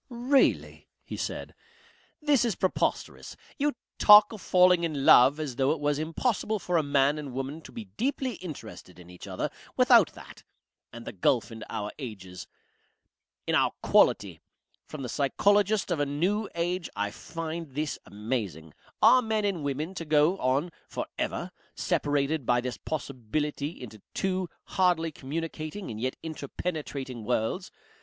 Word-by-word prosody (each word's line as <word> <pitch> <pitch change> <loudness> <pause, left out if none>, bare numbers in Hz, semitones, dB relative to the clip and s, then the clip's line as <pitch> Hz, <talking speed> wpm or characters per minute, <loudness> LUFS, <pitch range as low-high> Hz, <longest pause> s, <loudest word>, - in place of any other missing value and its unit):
"Really!" 250 +3 +1 0.2
he - - -7
said, - - -5 0.7
"this 290 -5 +4
is 230 -6 0
preposterous. 185 - -2 0.2
You 295 +1 +1 0.3
talk 210 +1 +8
of 215 - -9
falling 180 -1 +4
in 150 -5 -2
love 135 +5 +7
as 140 -6 -4
though 135 0 +2
it 160 - -6
was 145 0 0
impossible 215 +7 -1
for 180 -3 -3
a - - +4
man 140 0 +2
and 140 -4 -7
woman 135 +5 -4
to - - -12
be 230 -2 -7
deeply 255 +4 -2
interested 115 - -9
in 90 0 -13
each 90 - -11
other - - -3 0.3
without - - +6
that. - - -13 0.5
And 115 0 -10
the - - -5
gulf 115 +4 +1
in 110 -1 -8
our 105 0 -4
ages 95 -8 -8 1.0
in - - -1
our - - +3
quality! - - +3 0.5
From 150 -3 -7
the - - -3
Psychologist 200 - +2
of 170 - 0
a 145 - +2
New 185 +9 0
Age 175 0 -1
I 105 0 -1
find 165 +5 -6
this 150 0 -2
amazing. 100 - -4 0.3
Are 255 - +8
men 220 -3 0
and 185 -6 -1
women 145 +5 -3
to 175 - -5
go 150 +3 +3
on 135 +7 +1 0.2
for - - -4
ever - - -2 0.2
separated 145 +1 0
by 120 +1 +2
this 125 0 -4
possibility 145 +2 -3
into 110 -4 -10
two 185 -2 -1
hardly 175 -3 +1
communicating 155 - -5
and 110 0 -6
yet 130 +1 -1
interpenetrating 145 -5 -5
worlds? 120 - -1
155 Hz, 155 wpm, -28 LUFS, 130-185 Hz, 1.0 s, talk